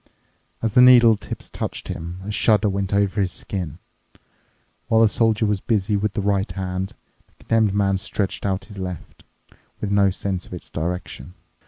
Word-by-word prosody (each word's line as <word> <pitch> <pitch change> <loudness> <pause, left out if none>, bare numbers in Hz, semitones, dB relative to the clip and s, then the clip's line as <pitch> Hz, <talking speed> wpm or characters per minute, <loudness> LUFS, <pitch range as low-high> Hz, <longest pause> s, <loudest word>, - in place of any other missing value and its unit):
As 110 -2 0
the 125 - +7
needle 120 -3 +8
tips 105 - -8
touched - - -4
him, 85 +3 -6
a 105 - -4
shudder 105 0 +3
went 100 -1 -1
over 100 0 +1
his 95 -2 0
skin. 90 -6 -5 1.1
While 110 0 +4
the 115 - +7
Soldier 110 0 +2
was 105 -2 0
busy 105 -2 0
with 100 0 -1
the 100 - -2
right 100 0 0
hand, 95 0 -3 0.3
the - - -34
Condemned 110 -3 +2
Man 100 -2 +2
stretched 100 -1 -3
out 95 -1 -1
his 100 -2 -11
left, 90 -2 -7 0.6
with 105 - -3
no 100 -1 +4
sense 95 -1 -4
of - - -8
its 90 - -11
direction. 90 -2 -5
100 Hz, 175 wpm, -22 LUFS, 95-105 Hz, 1.1 s, needle